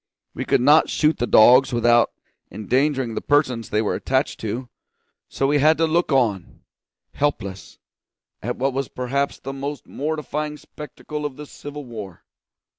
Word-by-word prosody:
We - - -5
could - - +2
not 150 +5 +5
shoot 155 +1 +1
the 120 - 0
dogs 125 +5 +6
without 120 0 +3 0.4
endangering 130 +5 0
the - - -3
persons 130 -6 +1
they 105 +2 +1
were 105 - -1
attached 135 +2 -1
to; 115 +4 -4 0.6
so 135 - -1
we 145 +1 +2
had 155 +3 +4
to 165 - +3
look 165 +1 +1
on, 110 -9 0 0.5
helpless, 100 - -3 0.6
at 120 +3 -3
what 135 +1 0
was 135 0 -2
perhaps 140 +3 -2
the 135 - -6
most 140 +1 -5
mortifying 150 0 -4
spectacle 150 +1 -8
of 145 -3 -4
the 150 - -9
civil 145 0 -9
war. 105 -7 -9
135 Hz, 155 wpm, -22 LUFS, 120-150 Hz, 0.6 s, dogs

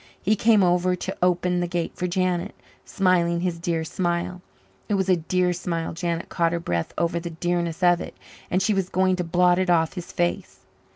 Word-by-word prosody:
He 215 +3 +2
came 215 -1 +4
over 180 0 +2
to - - -5
open 180 0 +2
the 175 - -1
gate 175 -1 -3
for 180 - -2
Janet, 185 +1 -1 0.3
smiling 175 -3 +1
his 175 -2 -2
dear 165 -1 -1
smile. 175 +2 -2 0.5
It 205 - +2
was 190 -1 0
a 185 - +6
dear 180 +2 0
smile 170 -2 -3
Janet 170 0 -3
caught 170 -1 0
her 170 - -1
breath 85 - -2
over 170 0 0
the 170 0 -6
dearness 170 +1 -2
of 175 -1 +4
it - - -8 0.3
and 185 +2 +1
she 215 - +2
was 190 -2 -1
going 185 -1 +2
to 180 - -1
blot 175 +1 +3
it 185 -1 0
off 165 -2 +3
his 180 -3 -7
face. 175 +2 -2
175 Hz, 205 wpm, -24 LUFS, 170-185 Hz, 0.5 s, a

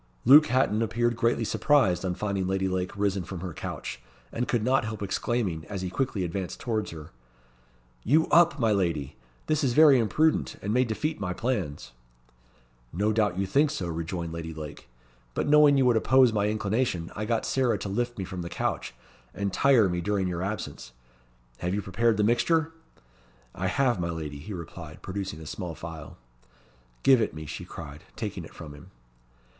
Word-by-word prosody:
Luke 150 +5 +8
Hatton 115 -3 +2
appeared 120 +1 0
greatly 115 0 +1
surprised 115 - +2
on 90 -1 -1
finding 100 -2 -2
Lady 95 0 0
Lake 95 +1 -3
risen 100 -2 0
from 90 0 -7
her 90 -3 -5
couch, - - -6 0.3
and 120 +2 -2
could 120 -3 0
not 130 +1 +2
help 110 -1 -5
exclaiming, 95 -4 -1
as 100 -2 -5
he 90 - -3
quickly 105 -2 -1
advanced 90 +1 -4
towards 110 -3 -2
her 80 -2 -10 0.9
"You 155 +6 +4
up, 170 -3 +5
my 115 -5 +2
lady! 85 -9 -1 0.3
This 155 -1 0
is 130 -3 +2
very 150 -2 +7
imprudent, 155 +8 +1
and 105 - -2
may 125 +2 +3
defeat 150 +7 -2
my 90 -2 -2
plans." 90 - -3 1.0
"No 105 +5 0
doubt 105 -4 +1
you 100 - 0
think 145 +10 +3
so," 95 - -3
rejoined 85 0 -4
Lady 80 -1 -6
Lake; 75 -4 -9 0.5
"but - - -1
knowing 150 -1 +6
you 135 - +3
would 125 -2 +4
oppose 130 +1 +4
my 105 -1 +1
inclination, 105 -4 -1
I 110 - -3
got 115 0 0
Sarah 130 -3 +1
to - - -5
lift 120 +5 -2
me 95 - -3
from 95 -1 -6
the 85 - -5
couch, - - -3 0.4
and 100 0 -2
tire 130 -7 +5
me 90 -1 -2
during 100 0 0
your 90 -1 -3
absence. 95 - -5 0.7
Have 90 +2 -1
you 105 - -1
prepared 110 +4 +1
the 105 - +2
mixture?" 160 +8 +2 0.8
"I 95 - -2
have, 120 +2 +1
my 85 -1 -1
lady," 75 -4 -5
he 80 +9 -9
replied, 85 -2 -9
producing 95 -4 -5
a - - -9
small 85 +1 -5
phial. 80 -2 -9 0.9
"Give 130 -3 +6
it 105 - -1
me," 80 0 -7
she - - -7
cried, - - -9
taking - - -5
it - - -13
from 75 -2 -9
him. 75 - -14
100 Hz, 185 wpm, -27 LUFS, 90-120 Hz, 1.0 s, Luke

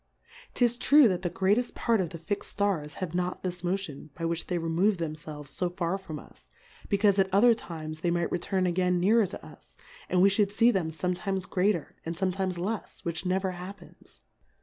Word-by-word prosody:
'Tis 240 -1 +3
true 280 +2 +6
that 185 -3 0
the 175 - -1
greateft 200 +7 +1
Part 230 -4 +2
of 175 - -2
the 165 -1 -8
lix'd 205 - -2
Stars 190 -8 -1
have 165 - -11
not 180 0 -2
this 180 -1 -4
Motion, 175 -5 -3
by 165 - -4
which 165 0 -2
they 180 - -1
remove 170 +5 +1
themfelves 155 -3 -6
fo 180 - 0
tar 180 +1 -2
from 160 -5 -7
us, - - -15 0.4
be 200 - +2
caufe 200 -1 +3
at 190 -1 +2
other 225 +5 +6
times 155 -7 -7
they 175 - 0
might 170 0 0
return 185 +2 0
again 180 0 +1
nearer 210 +3 +4
to 180 - -9
us, - - -16 0.3
and 180 0 +4
we 200 - +7
Ihould 200 0 +2
fee 230 +3 +4
them 185 -7 0
fom.etimes 180 +3 -2
greater, 185 -4 0
and 165 +1 -4
fome 185 -1 0
times 185 -1 -2
lefs, 195 +2 -4
which 170 +2 -2
never 190 +1 +1
happens. 180 +3 -11
185 Hz, 200 wpm, -28 LUFS, 170-200 Hz, 0.4 s, we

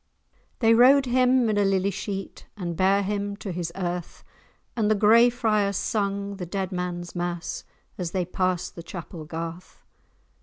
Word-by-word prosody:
They 225 -1 +6
rowed 265 +4 +6
him 255 0 +3
in 210 -1 +1
a - - +4
lily 195 0 +2
sheet, 195 0 -6
And 175 -3 -4
bare 195 +3 +3
him 200 0 -2
to 200 - -5
his 170 -1 -3
earth, 175 -2 -4 0.5
And 220 -3 +1
the 215 - +4
Gray 225 +4 +6
Friars 215 -5 +1
sung 200 -1 -2
the 180 - -5
dead 190 +1 -3
man's 180 -1 -4
mass, 175 -1 -4 0.3
As 175 -2 -2
they 180 0 -1
pass'd 185 0 -1
the 170 - -8
Chapel 170 -2 -8
Garth. 165 +2 -7
195 Hz, 160 wpm, -25 LUFS, 175-210 Hz, 0.5 s, They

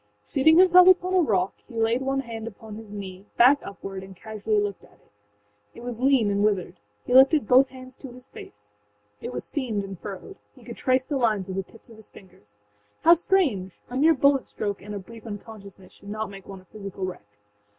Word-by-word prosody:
Seating 315 +3 +3
himself 365 0 +7
upon 370 0 +4
a 375 - +4
rock, 195 - +1
he 245 - -13
laid 225 +3 +1
one 270 0 -1
hand 230 -3 -7
upon 220 0 -10
his 215 -1 -10
knee, 195 -1 -8
back 265 +4 +6
upward, 195 -1 -8
and 190 0 -12
casually 215 +1 -2
looked 205 -1 -3
at - - -20
it. - - -30 0.6
It 235 - -11
was 240 -2 -6
lean 255 -5 +3
and 200 0 0
withered. 205 -4 0 0.3
He - - -2
lifted 270 -1 +6
both 260 +3 +5
hands 255 0 -12
to 275 - -10
his 250 +1 -14
face. 105 0 -14 0.5
It - - -6
was 125 0 -3
seamed 235 -8 -2
and 195 -2 -8
furrowed; 205 - -9 0.2
he - - -18
could - - -9
trace 260 -1 +1
the 285 - -2
lines 215 -6 0
with 190 - -4
the 195 - -5
tips 230 +1 -17
of 225 - -14
his 220 - -16
fingers. 175 - -19 0.5
How 335 - +8
strange!âa 265 - -1
mere 320 +3 +5
bullet 280 0 +2
stroke 205 -1 -4
and 210 +1 -8
a - - -3
brief 225 +4 -12
unconsciousness 205 -3 -10
should 200 - -14
not 215 0 -4
make 195 -1 -12
one 195 -1 -10
a - - -24
physical 195 -1 -7
wreck. 105 - -9
220 Hz, 215 wpm, -25 LUFS, 195-265 Hz, 0.6 s, How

